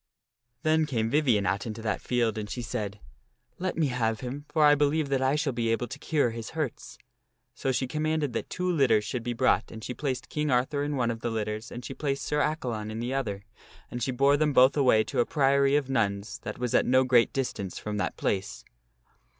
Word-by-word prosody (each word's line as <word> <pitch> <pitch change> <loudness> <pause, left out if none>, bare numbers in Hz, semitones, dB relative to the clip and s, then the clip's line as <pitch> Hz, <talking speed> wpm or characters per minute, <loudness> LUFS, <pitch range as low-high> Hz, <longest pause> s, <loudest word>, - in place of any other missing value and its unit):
Then 155 0 +3
came 115 -5 -1
Vivien 125 -9 +3
out 100 +2 -1
into 110 0 -6
that 110 -2 -1
field 120 -3 0
and 105 -1 -5
she 120 +4 -4
said, 105 -1 -4 0.3
" - - -43
Let 185 -1 -2
me 165 - +3
have 115 -4 -1
him, 140 +4 -6
lor 155 -1 +5
I 145 - +7
believe 145 0 +1
that 135 -1 +1
I 130 +2 +2
shall 150 -3 0
be 115 -1 -1
able 115 +2 0
to 135 - -7
cure 145 -6 +1
his 115 -1 -6
hurts." 150 -7 -4 0.6
So 135 - -1
she 130 0 0
commanded 155 0 -1
that - - -3
two 180 0 -2
litters 125 -10 +3
should 120 +3 -3
be 120 +1 -3
brought 115 - +2
and 110 -1 -9
she 125 - -4
placed 130 -1 -3
King 150 0 -2
Arthur 130 +3 +1
in 145 0 -2
one 120 -3 +1
of 115 - -5
the 120 - -2
litters 110 +1 -3
and 120 - -7
she - - -5
placed 140 -1 -2
Sir 150 - -1
Accalon 120 -10 -2
in 110 +1 -5
the 120 +3 -2
other, 105 -8 -2 0.5
and 120 - -5
she 125 - 0
bore 140 +3 +3
them 150 -1 +1
both 130 +1 +6
away 125 -6 +4
to 135 - -3
a 120 - +4
priory 140 -1 +3
of 145 -3 +1
nuns 110 -4 -1
that - - -6
was 125 -2 -2
at - - +3
no 130 +1 +5
great 125 -2 +4
distance 100 -8 -3
from 105 0 -4
that - - -2
place. 100 0 -2
125 Hz, 230 wpm, -28 LUFS, 115-145 Hz, 0.6 s, I